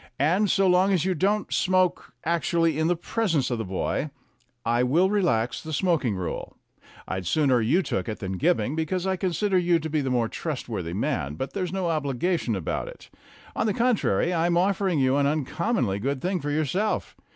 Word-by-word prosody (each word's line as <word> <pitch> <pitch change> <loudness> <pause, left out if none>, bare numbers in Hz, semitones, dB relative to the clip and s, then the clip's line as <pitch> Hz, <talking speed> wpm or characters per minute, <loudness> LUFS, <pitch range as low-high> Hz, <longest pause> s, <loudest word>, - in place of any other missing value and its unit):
And, 180 +9 +2
so 195 +1 +3
long 185 +1 +4
as 180 -3 +2
you 190 - +1
don't 200 +5 0
smoke 185 -1 +1
actually 165 -1 +1
in 160 - +2
the 175 - +2
presence 170 - -1
of 120 - -1
the - - -1
boy, 95 +9 -2 0.6
I 120 +1 +2
will 165 +10 +3
relax 170 - +1
the 160 - -7
smoking 155 - +1
rule. 90 -3 -5 0.5
I'd 95 -2 -4
sooner 135 - +3
you 150 - +2
took 95 - -2
it 110 - -4
than 95 -1 -5
Gibbing, 155 -2 +1
because 165 +3 -1
I 190 0 +1
consider 185 +1 +1
you 175 -1 +3
to 160 -1 -5
be 155 -1 +1
the 135 - -2
more 120 -3 +1
trustworthy 110 - -4
man, 90 - -2
but 130 - -5
there's 185 -4 -2
no 190 -2 -1
obligation 150 - 0
about 90 -5 -3
it. - - -12 0.4
On - - 0
the 205 - 0
contrary, 215 - +1
I 165 0 +2
am 170 0 +2
offering 190 -1 +1
you 135 0 +3
an 140 -1 +3
uncommonly 150 - -1
good 135 +5 -2
thing 180 +6 -1
for 145 - -3
yourself. 155 +8 -1
160 Hz, 195 wpm, -25 LUFS, 125-185 Hz, 0.6 s, long